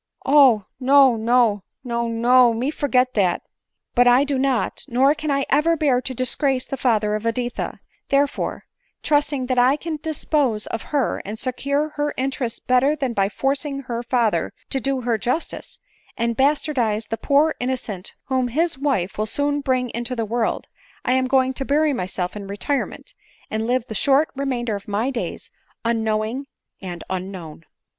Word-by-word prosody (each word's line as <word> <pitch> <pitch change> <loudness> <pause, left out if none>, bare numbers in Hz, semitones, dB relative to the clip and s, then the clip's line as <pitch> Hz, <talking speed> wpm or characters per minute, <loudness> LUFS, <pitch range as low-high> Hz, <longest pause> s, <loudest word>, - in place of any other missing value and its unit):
" - - -28
Oh! 265 -8 +5
no, 270 -1 +5
no, 225 -2 +2 0.2
no, 235 -2 -2
no— 240 +1 +4
me 255 +6 -1
forget 255 -4 +1
dat." 185 -4 +1 0.3
" - - -59
But 245 0 +4
I 245 +3 +6
do 280 -2 -1
not, 265 -3 0
nor 265 +4 +3
can 305 0 -5
I 275 -1 +1
even 330 +3 +3
bear 275 -5 +2
to 260 0 -5
disgrace 255 +1 0
the - - -4
father 220 -5 +1
of 215 0 -2
Editha; 240 +1 -3 0.3
therefore, 280 0 0 0.4
trusting 290 -3 +1
that 250 -1 +1
I 255 +3 +5
can 315 +1 -4
dispose 290 -8 0
of 225 - -4
her, 285 -4 0
and 210 +3 -6
secure 280 +5 -1
her 295 0 -1
interest 255 -3 -3
better 255 +4 +3
than 270 -5 -2
by 195 -2 +1
forcing 275 +3 -2
her 240 -3 -4
father 235 -7 0 0.2
to 270 - +2
do 270 +1 -1
her 235 -2 0
justice, 255 +9 -3 0.4
and 235 0 0
bastardize 260 -6 +1
the 225 - -2
poor 290 +5 +3
innocent 240 -7 -3
whom 260 -2 0
his 300 +3 0
wife 235 -10 -1
will 215 - 0
soon 285 +5 0
bring 255 -3 0
into 240 +2 -3
the 230 -2 -1
world, 230 +1 -1 0.4
I 250 - +2
am 260 0 +2
going 260 0 +2
to 270 - -3
bury 295 +2 +2
myself 180 -4 -3
in 200 -1 -7
retirement, 235 +8 -3 0.4
and 220 +1 -1
live 250 -1 +1
the 225 - -7
short 275 +8 +3
remainder 250 -5 -2
of 200 - -8
my 215 +6 0
days 245 - -5 0.3
unknowing 225 +3 -1 0.3
and 175 -3 -6
unknown." 180 -4 -6
255 Hz, 170 wpm, -22 LUFS, 225-275 Hz, 0.4 s, I